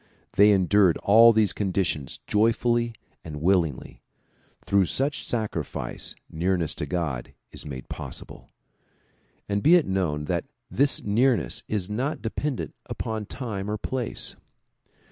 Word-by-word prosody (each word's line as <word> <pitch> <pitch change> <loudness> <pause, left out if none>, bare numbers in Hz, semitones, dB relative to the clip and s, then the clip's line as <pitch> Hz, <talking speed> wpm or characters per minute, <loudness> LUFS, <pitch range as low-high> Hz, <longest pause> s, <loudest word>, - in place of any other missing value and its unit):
They 100 +1 +6
endured 95 -2 +4
all 115 +3 +8
these 110 -4 +2
conditions 90 - -2
joyfully 115 +2 +1 0.3
and 75 -2 -7
willingly. 85 -4 0 0.6
Through 100 -2 +3
such 140 - -1
sacrifice 105 - -2
nearness 85 0 0
to - - -2
God 80 -9 -3 0.2
is - - -7
made 65 -3 -7
possible. - - -7 1.0
And 100 0 0
be 160 - +6
it 175 - +4
known 85 -6 -1
that - - -1 0.3
this 140 +2 +2
nearness 115 0 +1
is 100 -4 -2
not 125 +9 -2
dependent 130 +4 -3
upon 110 -2 -4
time 105 -6 -5
or 105 - -1
place. 125 +1 -1
100 Hz, 125 wpm, -25 LUFS, 90-115 Hz, 1.0 s, all